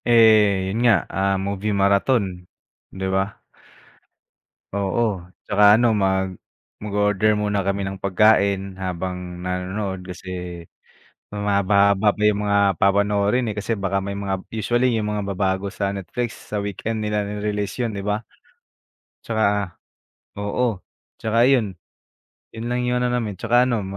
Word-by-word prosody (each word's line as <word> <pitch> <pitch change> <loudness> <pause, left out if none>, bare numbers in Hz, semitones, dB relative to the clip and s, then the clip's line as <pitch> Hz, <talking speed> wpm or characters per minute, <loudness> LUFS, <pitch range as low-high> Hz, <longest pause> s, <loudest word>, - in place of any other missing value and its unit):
Eh, 110 -5 +5
'yon 115 - -1
nga, 115 -7 +4
ah, 95 0 +1
movie 100 +2 -2
marathon, 100 +5 +3 0.7
'di 95 0 -5
ba? 95 +2 -2 1.3
Oo, 100 -1 -1 0.2
tsaka 105 0 +5
ano, 120 +1 +3
mag 95 -2 0 0.4
mag-o-order 105 0 +1
muna 105 -1 0
kami 100 0 -1
ng 95 0 -5
pagkain 100 -1 +3
habang 90 -1 -4
nanonood 95 +1 -3
kasi 90 -1 -7 0.7
mahaba-haba 100 0 +2
pa 105 - -4
yung 105 -1 +3
mga 100 0 +3 0.2
papanoorin, 100 +4 +2
eh, - - -9
kasi 105 +3 -2
baka 100 -1 -1
may 100 +1 -4
mga 95 -1 -2
usually 120 +3 +1
yung 105 -1 -1
mga 105 -1 -2
ba 100 - -2
bago 95 0 0
sa 100 -1 -2
Netflix, 115 +5 -5
sa - - +1
weekend 110 +2 -3
nila 105 0 0
re-release 105 +1 -3
'yon, 115 - -2
'di 100 - -4
ba? 105 +1 -1 1.0
Tsaka 105 -4 0 0.6
oo, 105 +1 -1 0.4
tsaka 115 +2 +3
'yon. 115 -9 +2 0.8
'Yon 115 +1 -5
lang 125 - 0
yung 125 0 +1
ano 125 - +1
namin. 115 -4 -1
Tsaka 120 +5 +3
ano, 115 -4 0
100 Hz, 140 wpm, -22 LUFS, 95-110 Hz, 1.3 s, Eh